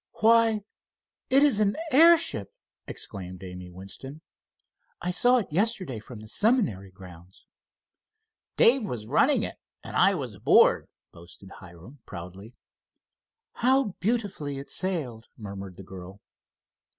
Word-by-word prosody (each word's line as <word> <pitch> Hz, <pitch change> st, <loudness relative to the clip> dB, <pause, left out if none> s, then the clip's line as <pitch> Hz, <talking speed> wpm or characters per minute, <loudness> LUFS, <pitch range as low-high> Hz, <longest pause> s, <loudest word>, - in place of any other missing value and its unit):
"Why, 225 Hz, -1 st, +4 dB, 0.7 s
it 275 Hz, +2 st, +5 dB
is 275 Hz, -8 st, +4 dB
an 205 Hz, -1 st, +2 dB, 0.2 s
airship!" 310 Hz, -, +4 dB, 0.4 s
exclaimed 90 Hz, -1 st, -6 dB
Amy 90 Hz, -1 st, -9 dB
Winston. 100 Hz, -, -10 dB, 0.8 s
"I 180 Hz, -, -2 dB
saw 245 Hz, +8 st, +4 dB
it 215 Hz, -9 st, -3 dB
yesterday 185 Hz, -, -1 dB
from 110 Hz, 0 st, -11 dB
the 110 Hz, -, -12 dB
seminary 195 Hz, -, 0 dB
grounds." 90 Hz, -1 st, -15 dB, 1.1 s
"Dave 250 Hz, +1 st, +5 dB
was 120 Hz, -, -5 dB
running -, -, +2 dB
it, -, -, -4 dB, 0.3 s
and -, -, -8 dB
I -, -, +4 dB
was -, -, -5 dB
aboard," -, -, +4 dB, 0.2 s
boasted 85 Hz, +3 st, -14 dB
Hiram, 95 Hz, -, -14 dB
proudly. 95 Hz, +6 st, -10 dB, 1.0 s
"How 260 Hz, -1 st, +2 dB
beautifully 200 Hz, -, -2 dB
it 140 Hz, -, -7 dB
sailed," 145 Hz, -12 st, -2 dB
murmured 100 Hz, -3 st, -8 dB
the 95 Hz, -, -10 dB
girl. 95 Hz, +1 st, -11 dB
125 Hz, 120 wpm, -26 LUFS, -, 1.1 s, it